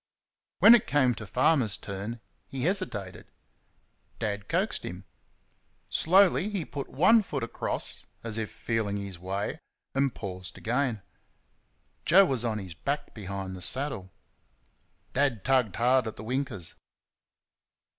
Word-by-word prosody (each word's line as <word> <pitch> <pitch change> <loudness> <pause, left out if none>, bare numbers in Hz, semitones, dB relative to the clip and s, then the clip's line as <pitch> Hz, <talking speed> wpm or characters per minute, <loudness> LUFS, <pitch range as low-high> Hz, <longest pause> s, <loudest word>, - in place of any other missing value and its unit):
When 230 - +9
it 240 - +4
came 130 -4 +3
to 110 -2 -8
Farmer's 125 - +2
turn 100 +4 -6 0.3
he 130 -2 -5
hesitated. 140 - -2 0.9
Dad 100 -1 -3
coaxed - - 0
him. 90 +2 -7 0.9
Slowly 190 +3 +4
he 195 -6 -3
put 140 -2 -6
one 215 - +5
leg 140 -4 -1
across, 115 - -3 0.2
as 115 -1 -3
if 110 - -3
feeling 110 -3 -2
his 100 -3 -6
way, 95 +3 -3 0.3
and 135 -1 +1
paused 95 -2 -6
again. 120 -3 -1 1.0
Joe 195 +2 +7
was 130 -8 0
on 115 -2 -1
his 95 -5 -6
back 140 - -3
behind 95 -2 -5
the 90 - -9
saddle. 130 -5 0 1.0
Dad 130 -7 +1
tugged 130 -7 +2
hard 125 0 +3
at 110 - -5
the 110 - -9
winkers. 120 - -2
115 Hz, 130 wpm, -28 LUFS, 100-140 Hz, 1.0 s, When